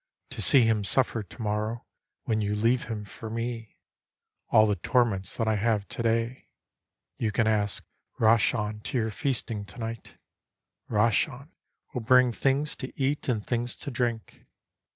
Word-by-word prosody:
To -, -, -4 dB
see 135 Hz, -4 st, +7 dB
him 110 Hz, -2 st, +2 dB
suffer 120 Hz, +2 st, +1 dB
to 105 Hz, +3 st, -11 dB
morrow, 105 Hz, +2 st, -2 dB, 0.4 s
when 110 Hz, -1 st, 0 dB
you 105 Hz, 0 st, 0 dB
leave 115 Hz, +4 st, +2 dB
him 110 Hz, -2 st, -5 dB
for 110 Hz, +2 st, -8 dB
me, 115 Hz, -1 st, -5 dB, 0.7 s
All 110 Hz, -, +6 dB
the 105 Hz, -1 st, +1 dB
torments 100 Hz, -2 st, +1 dB
that 115 Hz, -, 0 dB
I 110 Hz, -1 st, +2 dB
have 105 Hz, -1 st, 0 dB
to -, -, -5 dB
day. 115 Hz, +2 st, -1 dB, 0.7 s
You 110 Hz, -, 0 dB
can 115 Hz, +2 st, +1 dB
ask 105 Hz, -3 st, 0 dB, 0.3 s
Rahchan 110 Hz, -1 st, +2 dB
to 130 Hz, -, -3 dB
your 110 Hz, -2 st, 0 dB
feasting 115 Hz, -3 st, -2 dB
to 105 Hz, -, -14 dB
night, 115 Hz, -2 st, -6 dB, 0.7 s
Rahchan 115 Hz, +6 st, +1 dB, 0.4 s
will 125 Hz, -, -2 dB
bring 125 Hz, +2 st, +5 dB
things 135 Hz, +5 st, 0 dB
to 130 Hz, -, -6 dB
eat 135 Hz, +1 st, 0 dB
and 110 Hz, -4 st, -1 dB
things 120 Hz, 0 st, -2 dB
to 140 Hz, -, -6 dB
drink 120 Hz, -3 st, -3 dB
115 Hz, 155 wpm, -27 LUFS, 105-125 Hz, 0.7 s, see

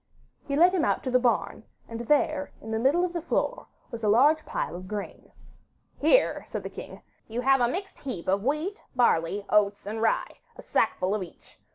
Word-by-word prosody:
He 280 Hz, -, -1 dB
led 350 Hz, +5 st, +5 dB
him 360 Hz, -4 st, +1 dB
out -, -, +1 dB
to 255 Hz, -, -2 dB
the 255 Hz, -, +4 dB
barn, 245 Hz, -1 st, 0 dB, 0.2 s
and 230 Hz, 0 st, -7 dB
there 290 Hz, +3 st, +1 dB
in 220 Hz, -, -8 dB
the 220 Hz, -, 0 dB
middle 290 Hz, +9 st, +3 dB
of 355 Hz, -, -5 dB
the 340 Hz, -, -2 dB
floor 355 Hz, +9 st, -2 dB, 0.2 s
was 235 Hz, -1 st, -7 dB
a -, -, +1 dB
large 290 Hz, +8 st, +5 dB
pile -, -, -3 dB
of 185 Hz, +1 st, -8 dB
grain. 205 Hz, 0 st, -7 dB, 0.7 s
'Here,' -, -, +3 dB
said -, -, -5 dB
the -, -, -6 dB
king, -, -, -10 dB, 0.2 s
'you 230 Hz, +2 st, -3 dB
have 270 Hz, 0 st, +4 dB
a 240 Hz, -, +4 dB
mixed 385 Hz, +10 st, -5 dB
heap 250 Hz, -, -6 dB
of 195 Hz, +2 st, +1 dB
wheat, 305 Hz, -, -1 dB
barley, 200 Hz, -4 st, +2 dB
oats, 205 Hz, -1 st, +2 dB
and 220 Hz, +2 st, -4 dB
rye, 225 Hz, -, 0 dB, 0.2 s
a -, -, -12 dB
sackful 185 Hz, +2 st, 0 dB
of 210 Hz, -, -1 dB
each. 180 Hz, -, -12 dB
245 Hz, 205 wpm, -27 LUFS, 210-305 Hz, 0.7 s, led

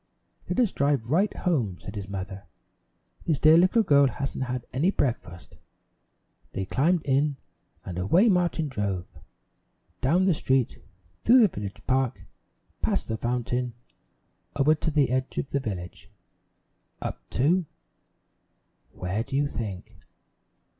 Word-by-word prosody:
"Let -, -, 0 dB
us 235 Hz, -6 st, +3 dB
drive 140 Hz, -4 st, 0 dB
right 195 Hz, +7 st, +3 dB
home," 125 Hz, -, -1 dB
said -, -, -8 dB
his 100 Hz, -1 st, -6 dB
mother. 95 Hz, 0 st, -6 dB, 0.8 s
"This 160 Hz, -4 st, +1 dB
dear 155 Hz, +3 st, +6 dB
little 185 Hz, +7 st, +5 dB
girl 140 Hz, -6 st, +5 dB
hasn't 135 Hz, +2 st, -3 dB
had 125 Hz, -1 st, -4 dB
any 145 Hz, +9 st, +2 dB
breakfast." 115 Hz, -, -3 dB, 1.0 s
They 95 Hz, -, -2 dB
climbed 160 Hz, -, +1 dB
in, 140 Hz, +1 st, +1 dB, 0.5 s
and 90 Hz, -1 st, -5 dB
away 170 Hz, -, +4 dB
Martin 175 Hz, -5 st, +2 dB
drove, 100 Hz, -8 st, -4 dB, 0.8 s
down 165 Hz, +8 st, +3 dB
the 185 Hz, -2 st, +4 dB
street 130 Hz, -4 st, 0 dB, 0.4 s
through 250 Hz, +2 st, +7 dB
the 220 Hz, -, +7 dB
village 100 Hz, -, -7 dB
park, 130 Hz, -2 st, 0 dB, 0.6 s
past -, -, 0 dB
the 110 Hz, -, 0 dB
fountain, 120 Hz, +1 st, -2 dB, 0.8 s
over 145 Hz, +2 st, +4 dB
to 160 Hz, +1 st, -2 dB
the 145 Hz, -5 st, +2 dB
edge 130 Hz, +1 st, -1 dB
of 135 Hz, -, -3 dB
the 140 Hz, -, +1 dB
village, 95 Hz, -9 st, -6 dB, 0.9 s
up -, -, -5 dB, 0.2 s
to 165 Hz, +6 st, +3 dB, 1.3 s
where 90 Hz, +4 st, -2 dB
do 135 Hz, -, -5 dB
you 145 Hz, +1 st, +2 dB
think? 105 Hz, -9 st, -6 dB
135 Hz, 135 wpm, -26 LUFS, 110-160 Hz, 1.3 s, through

